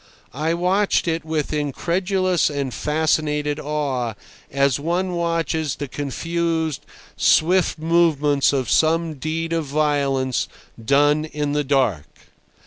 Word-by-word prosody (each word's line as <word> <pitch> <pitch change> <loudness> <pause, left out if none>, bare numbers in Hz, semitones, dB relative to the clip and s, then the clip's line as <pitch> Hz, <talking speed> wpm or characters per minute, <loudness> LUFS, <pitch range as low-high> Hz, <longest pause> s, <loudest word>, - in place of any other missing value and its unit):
I 155 +4 -1
watched 185 +3 +1
it 165 0 -1
with 155 -1 -2
incredulous 180 +5 0
and 140 -3 -3
fascinated 150 -1 0
awe, 135 -7 -2 0.3
as 140 -1 +1
one 175 +5 -1
watches 165 -3 -1
the 145 - -5
confused, 160 +2 -2 0.3
swift 180 +3 +3
movements 155 -3 +2
of 135 -3 -1
some 165 0 +2
deed 160 +3 -3
of 165 -2 -1
violence 140 -3 0 0.4
done 145 +5 +3
in 150 -1 -3
the 145 0 0
dark. 125 - +1
150 Hz, 115 wpm, -21 LUFS, 140-165 Hz, 0.4 s, swift